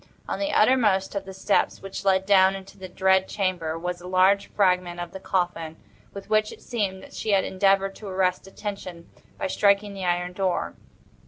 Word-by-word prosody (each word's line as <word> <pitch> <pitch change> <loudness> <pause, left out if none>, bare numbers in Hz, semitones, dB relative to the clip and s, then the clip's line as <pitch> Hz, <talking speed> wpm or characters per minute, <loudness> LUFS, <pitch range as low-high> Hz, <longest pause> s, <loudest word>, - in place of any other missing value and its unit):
On - - -3
the 295 0 -1
uttermost 215 -5 +3
of 200 -1 -4
the 190 - -8
steps 195 +2 +1
which 195 0 -7
led 190 -1 +2
down 190 -1 +5
into 195 0 -10
the 190 -1 -9
dread 190 +1 +2
chamber 180 -5 -2
was 175 +1 -4
a 180 - -9
large 190 +2 +3
fragment 180 -3 +1
of 175 -1 -5
the 190 - -8
coffin, 175 -4 -2 0.3
with 200 - -9
which, 215 0 +2
it - - -13
seemed, 195 -5 -3
that - - -14
she 215 - -1
had 195 -1 +4
endeavored 195 0 +2
to 215 - -9
arrest 185 -1 0
attention 190 -4 -7 0.3
by - - -3
striking 200 +1 +2
the 195 -1 -6
iron 180 0 -1
door. 185 -1 -1
190 Hz, 190 wpm, -25 LUFS, 180-200 Hz, 0.3 s, down